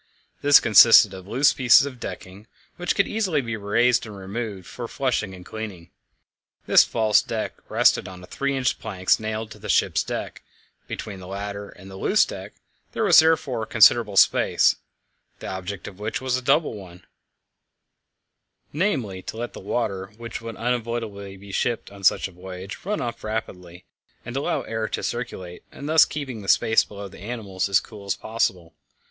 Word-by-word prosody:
This 145 0 +7
consisted 110 -1 +7
of 95 0 -10
loose 135 +7 +3
pieces 125 +1 +5
of 130 -3 -8
decking, 100 +1 -8 0.3
which 175 -1 -1
could 200 - +2
easily 195 -9 0
be 115 -4 -3
raised 115 +4 +2
and 105 -2 -9
removed 100 0 -6
for 120 -1 -7
flushing 125 -7 -2
and 90 -1 -13
cleaning. 100 -6 -8 0.7
This - - +7
false 110 -2 +2
deck - - -4 0.2
rested - - +3
on 90 -1 -10
three 140 +8 -2
inch 130 -2 0
planks 95 -4 0
nailed 110 0 -4
to - - -11
the - - -9
ship's - - +2
deck; - - -5 0.5
between 100 -3 -6
the 90 - -10
latter 100 +1 -6
and 95 0 -14
the 95 - -9
loose - - +3
deck - - -9 0.4
there - - -1
was - - +7
therefore 160 -7 +2
a - - -3
considerable 110 -2 +4
space, - - +4 0.6
the - - -11
object 95 +1 -6
of 95 - -11
which 105 +1 -3
was 130 -1 -1
a 130 - -2
double 140 +4 +2
one 90 -3 -12 1.7
namely, 130 - -1
to 110 - -8
let 120 +1 -5
the - - -9
water, 100 -6 -3
which 115 -1 -7
would 115 0 -7
unavoidably 115 -4 -3
be 100 +1 -12
shipped 115 +2 -2
on 100 -1 -13
such 95 - +3
a - - -15
voyage, 95 +2 -9
run 210 +2 -2
off 120 -1 -5
rapidly, 90 -5 -6 0.4
and 120 - -6
to 135 - -1
allow - - -1
air 110 -1 -3
to - - -4
circulate, 95 -7 -5
and 140 - -8
thus 160 +1 +6
keep 150 -2 -5
the 110 -6 -8
space 110 +2 +4
below 100 -1 -9
the 95 - -14
animals 100 -3 -4
as 100 - +4
cool 105 -3 -12
as 100 - 0
possible. 95 -7 -2
110 Hz, 180 wpm, -24 LUFS, 95-120 Hz, 1.7 s, This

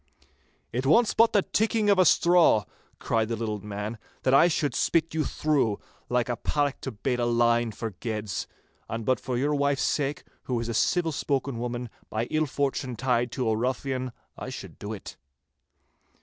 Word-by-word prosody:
'It 125 +2 -1
wants 220 - +4
but 230 0 +5
the 205 -3 +3
tickling 220 0 +1
of 200 -2 +4
a 185 - +6
straw,' 170 - +5 0.3
cried 115 -1 0
the 115 - -2
little 110 -2 -3
man, 105 +2 -5 0.2
'that 130 - +2
I 140 +5 +7
should 150 -5 0
spit 165 +5 +1
you 160 -1 +1
through, 140 -10 0 0.3
like 125 -1 +1
a 120 - -1
paddock 145 -2 -1
to 135 - -4
bait 125 +3 -2
a 120 - +1
line 120 0 +2
for 110 +1 -5
geds. 105 -2 -4 0.4
And 115 -1 -4
but 130 - +2
for 125 -2 -3
your 145 +4 +1
wife's 140 -1 +1
sake, 145 0 -1 0.2
who 125 -2 -1
is 115 - -3
a - - -2
civil 165 +8 +2
spoken 135 -3 -1
woman 120 0 -3 0.2
by 110 +2 -1
ill 155 0 +1
fortune 135 -2 -2
tied 120 0 0
to 125 -3 -1
a 110 - +2
ruffian, 130 +2 -2 0.2
I - - -6
should - - -9
do 105 - -6
it. 105 -4 -8
125 Hz, 185 wpm, -27 LUFS, 115-145 Hz, 0.4 s, I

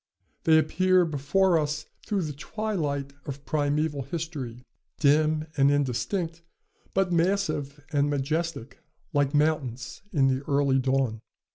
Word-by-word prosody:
They 160 -1 +6
appear 180 +3 +3
before 165 +4 +2
us 150 0 -2 0.2
through 200 -3 0
the 150 -2 -4
twilight 145 -6 -3
of 140 0 -6
primeval 145 0 0
history, 135 -5 -5 0.4
dim 155 +1 +3
and 140 0 +5
indistinct, 160 - -1 0.5
but 190 -1 +2
massive 160 -5 0
and 145 0 +2
majestic, 145 -1 -2 0.3
like 145 0 +2
mountains 145 -5 0
in 140 -6 +3
the 130 0 +1
early 140 -2 +3
dawn. 130 -4 0
150 Hz, 120 wpm, -27 LUFS, 140-165 Hz, 0.5 s, They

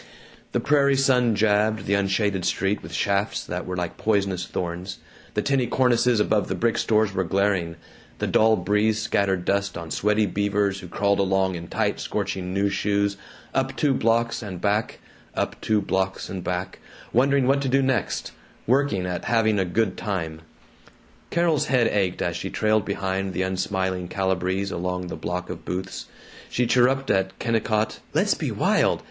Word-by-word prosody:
The - - +1
prairie 140 -1 +3
sun 125 -4 +3
jabbed 105 +1 +2
the 100 - 0
unshaded 100 -1 +1
street 95 +3 0
with 80 - -10
shafts 100 +4 0
that - - -4
were 90 - -3
like 90 -1 -3
poisonous 100 -4 0
thorns 90 +2 -4 0.4
the 105 - +1
tinny 135 -3 +1
cornices 125 -2 +3
above 105 -1 +2
the - - -2
brick 115 -1 +1
stores 110 -2 +2
were 95 0 0
glaring; 95 -2 0 0.4
the - - -2
dull 110 0 +4
breeze 105 +1 +1
scattered 95 -5 0
dust 100 -1 0
on 85 -2 -7
sweaty 105 +1 +2
Beavers 100 0 0
who 90 - -9
crawled 100 +3 +1
along 95 -1 +2
in 85 -1 -6
tight - - -1
scorching 90 -1 -3
new 100 +1 +1
shoes, 100 0 0 0.4
up - - 0
two 145 -3 +2
blocks 115 0 +1
and 95 -5 -6
back, 105 +3 0 0.4
up - - -2
two 110 -1 +2
blocks 95 0 -1
and 95 -2 -5
back, 90 +1 -3 0.3
wondering 135 +2 +3
what 135 +2 +3
to 135 - -1
do 135 +1 +3
next, 130 -6 -1 0.3
working 125 -7 +2
at 90 -1 -4
having 110 -2 +2
a 95 - +1
good 95 +2 0
time. 80 -6 -3 0.9
Carol's 170 -4 +1
head 125 -3 +3
ached 95 -3 0
as 85 -1 -1
she 85 - -4
trailed 110 -1 +1
behind 95 -1 -2
the 95 - 0
unsmiling 95 -1 -1
Calibrees 95 +1 -1
along 90 +1 -3
the - - -4
block 90 +1 -4
of - - -8
booths. 90 +1 -5 0.4
She 125 - 0
chirruped 130 +3 +3
at 95 0 0
Kennicott, 110 -2 0 0.2
"Let's - - +3
be - - -3
wild! - - +2
100 Hz, 170 wpm, -24 LUFS, 95-110 Hz, 0.9 s, dull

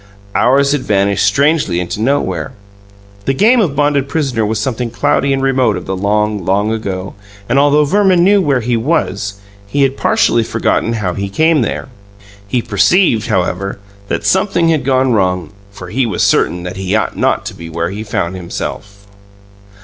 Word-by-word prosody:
Hours 140 +3 +3
had 145 -2 0
vanished 100 -2 +1
strangely 120 - +2
into 90 +4 -4
nowhere; 95 - -1 0.7
the 135 - 0
game 230 - +4
of 160 -9 -1
bonded 145 -1 +1
prisoner 135 -8 -1
was 110 +1 -1
something 120 +2 -2
cloudy 120 +5 0
and 135 0 0
remote 130 -6 +2
of 90 - -7
the 95 - -3
long, 105 +1 0
long 100 +4 +1
ago, 100 -4 -4 0.3
and, 125 +3 +2
although 145 +1 +4
Verman 190 +1 +3
knew 200 +2 +4
where 140 -7 +1
he 120 +1 0
was, 105 - -1 0.3
he 140 +7 +1
had 135 0 0
partially 120 - +2
forgotten 115 +1 0
how 105 -6 -2
he 100 +1 -4
came 160 +7 +2
there. 115 - -3 0.6
He 120 +3 -1
perceived, 115 - +2
however, 95 -1 -1 0.3
that - - -3
something 190 -3 +2
had 160 -3 +1
gone 130 -1 +2
wrong, 90 -5 0 0.2
for 95 -3 -10
he 125 +4 0
was 100 - -1
certain 90 0 +1
that 90 +1 -6
he 95 +1 -1
ought 110 - -1
not - - 0
to - - -5
be 85 0 -9
where 85 +2 -3
he 105 +2 -5
found 105 -5 -3
himself. 100 +3 -7
110 Hz, 175 wpm, -15 LUFS, 100-140 Hz, 0.7 s, game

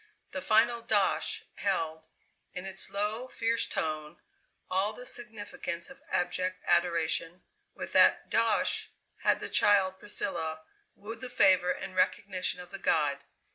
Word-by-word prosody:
The 280 - -4
final 235 0 +3
"dosh!" 200 -8 +1
held, 160 -5 -1 0.5
in 180 +1 -5
its 190 0 -2
low, 210 +5 -2
fierce 230 -2 0
tone, 155 0 -3 0.5
all 195 +3 0
the 250 +3 -10
significance 210 -5 -4
of 270 +1 -14
abject 185 +1 -1
adoration. 170 0 +1 0.3
With - - -6
that - - +5
"dosh" - - +2 0.3
had - - +2
the - - -4
child 190 -2 +3
Priscilla 160 -6 -3 0.3
wooed 225 +3 -9
the 255 - -5
favour 185 -7 +4
and 185 +1 -3
recognition 185 -1 0
of 180 0 -10
the - - -6
god. 145 -3 +1
190 Hz, 135 wpm, -30 LUFS, 170-215 Hz, 0.5 s, that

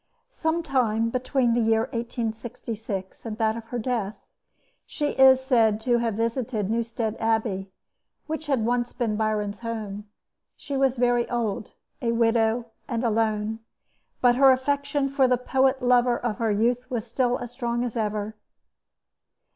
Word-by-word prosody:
Some 335 -7 -1
time 230 -6 +1
between 255 -1 +1
the 240 - +2
year 225 0 +3
1866 225 -4 -5
and 220 -2 -5
that 220 -1 +1
of 230 -1 -7
her 245 +2 -5
death, 225 -3 -3 0.6
she 295 -2 -2
is 265 -1 +6
said 225 -5 +3
to 240 +1 +2
have 230 -3 -1
visited 230 -2 -1
Newstead 230 -1 -1
Abbey, 220 -4 0 0.6
which 315 0 -5
had 260 -6 +1
once 240 0 0
been 230 -4 -1
Byron's 210 -1 -1
home. 215 -3 -5 0.5
She 285 - -6
was 270 -1 +2
very 245 -1 +2
old, 225 -4 -2 0.3
a 235 -1 +1
widow, 230 0 +2 0.2
and 235 -1 -2
alone; 220 -1 0 0.6
but 245 -1 +4
her 270 0 +7
affection 285 +2 +1
for 275 -1 +3
the 250 0 +3
poet 265 +1 +1
lover 245 -1 +4
of 230 -4 -3
her 225 -1 +1
youth 240 +4 +1
was 240 -4 -2
still 245 +1 0
as 240 - -7
strong 240 -1 -2
as 240 -3 -4
ever. 215 -1 -2
235 Hz, 150 wpm, -25 LUFS, 220-250 Hz, 0.6 s, her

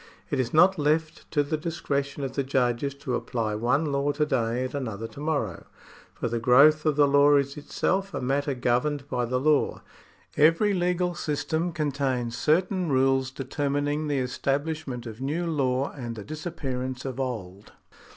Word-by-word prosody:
It 140 - 0
is 125 -2 0
not 180 +3 +5
left 155 +2 0
to 145 -2 +2
the 155 +2 -2
discretion 145 -3 -3
of 135 - -3
the 140 - 0
judges 130 0 0
to 140 -2 -5
apply 115 -4 -2
one 130 +8 +1
law 140 +1 +1
to 150 - +1
day 125 -3 0
and 130 - -6
another 115 -6 -4
to - - -12
morrow, 145 - -2 0.5
for - - -2
the 115 0 -1
growth 145 +6 +5
of 150 - +3
the 145 -1 +5
law 145 +1 +5
is 140 0 +1
itself 190 +6 -1
a 140 - -3
matter 140 +2 0
governed 130 +3 0
by 125 -1 0
the 125 +2 -1
law. 150 +1 +1 0.5
Every 165 +7 +4
legal 180 -1 0
system 160 +2 -2
contains 135 -6 -1
certain 180 +5 +1
rules 135 0 +2
determining 145 +3 -2
the 145 -2 0
estabhshment 135 0 -2
of 115 +1 -8
new 155 +6 -1
law 135 -4 0
and 120 -4 -6
the 105 - -7
disappearance 135 - -5
of 130 -1 -4
old. 105 -6 -5
140 Hz, 170 wpm, -26 LUFS, 125-155 Hz, 0.5 s, not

